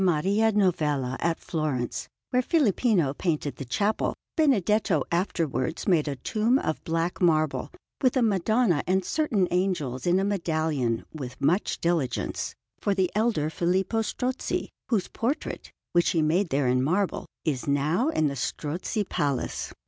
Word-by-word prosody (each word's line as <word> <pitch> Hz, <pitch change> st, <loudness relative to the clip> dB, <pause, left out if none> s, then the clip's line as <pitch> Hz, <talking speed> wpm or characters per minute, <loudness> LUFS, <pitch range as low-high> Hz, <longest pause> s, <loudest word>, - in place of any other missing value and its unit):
Maria 195 Hz, +6 st, +3 dB
Novella 150 Hz, -10 st, +1 dB
at 170 Hz, -1 st, 0 dB
Florence, 150 Hz, -7 st, -2 dB, 0.2 s
where 250 Hz, -, +3 dB
Filippino 220 Hz, -, +2 dB
painted 150 Hz, -3 st, -2 dB
the 135 Hz, -, -6 dB
chapel, 205 Hz, -, 0 dB, 0.2 s
Benedetto 210 Hz, -, +2 dB
afterwards 165 Hz, -4 st, -1 dB
made 165 Hz, -6 st, +3 dB
a 140 Hz, -, -2 dB
tomb 220 Hz, -, +1 dB
of 155 Hz, -, -2 dB
black 165 Hz, +3 st, -1 dB
marble, 155 Hz, -4 st, +2 dB, 0.3 s
with 260 Hz, -1 st, +3 dB
a 250 Hz, -, +3 dB
Madonna 210 Hz, -3 st, +2 dB
and 185 Hz, 0 st, +2 dB
certain 220 Hz, -, +1 dB
angels 175 Hz, -8 st, -1 dB
in 175 Hz, +2 st, +4 dB
a -, -, +1 dB
medallion, 155 Hz, -, 0 dB
with 130 Hz, -5 st, -7 dB
much 175 Hz, +8 st, +1 dB
diligence, 165 Hz, -7 st, -1 dB, 0.2 s
for 200 Hz, -, 0 dB
the 190 Hz, -2 st, +1 dB
elder 210 Hz, -9 st, +1 dB
Filippo 190 Hz, +7 st, +1 dB
Strozzi, 250 Hz, +3 st, -2 dB, 0.2 s
whose 215 Hz, -6 st, +1 dB
portrait, 250 Hz, +6 st, -3 dB, 0.2 s
which 175 Hz, 0 st, +3 dB
he 165 Hz, -, +2 dB
made 170 Hz, +4 st, +2 dB
there 135 Hz, -1 st, +1 dB
in 125 Hz, +1 st, +3 dB
marble, 180 Hz, +8 st, 0 dB, 0.2 s
is 145 Hz, -5 st, -1 dB
now 150 Hz, -, +2 dB
in 155 Hz, -, +1 dB
the 140 Hz, -1 st, 0 dB
Strozzi 160 Hz, -, -2 dB
Palace. 140 Hz, -3 st, -2 dB
175 Hz, 145 wpm, -26 LUFS, 150-210 Hz, 0.3 s, in